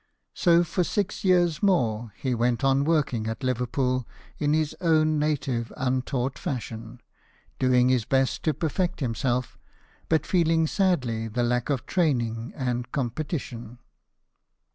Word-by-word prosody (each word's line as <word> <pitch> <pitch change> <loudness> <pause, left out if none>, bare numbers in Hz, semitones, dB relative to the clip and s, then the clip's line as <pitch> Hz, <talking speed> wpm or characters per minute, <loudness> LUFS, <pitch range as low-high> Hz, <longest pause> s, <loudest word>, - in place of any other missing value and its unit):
So 170 -1 +4
for 175 +2 0
six 200 +3 -2
years 175 -4 +3
more 120 - +1
he 130 -2 -2
went 120 +2 0
on 135 +1 +3
working 140 -9 +1
at 115 +4 -4
Liverpool 125 0 0 0.3
in 145 0 +1
his 155 -2 0
own 155 -3 +3
native 140 -6 -1
untaught 130 0 -1
fashion, 115 -2 -5 0.6
doing 125 -1 +4
his 125 -4 +2
best 135 0 +1
to 155 -3 +2
perfect 170 +4 -1
himself, 125 -1 -1 0.5
but 160 -3 +2
feeling 165 -3 +2
sadly 130 - 0
the 120 +3 -1
lack 120 +1 0
of 135 -5 -1
training 120 -9 0
and 125 -2 -2
competition. 125 -3 -4
130 Hz, 130 wpm, -26 LUFS, 120-155 Hz, 0.6 s, So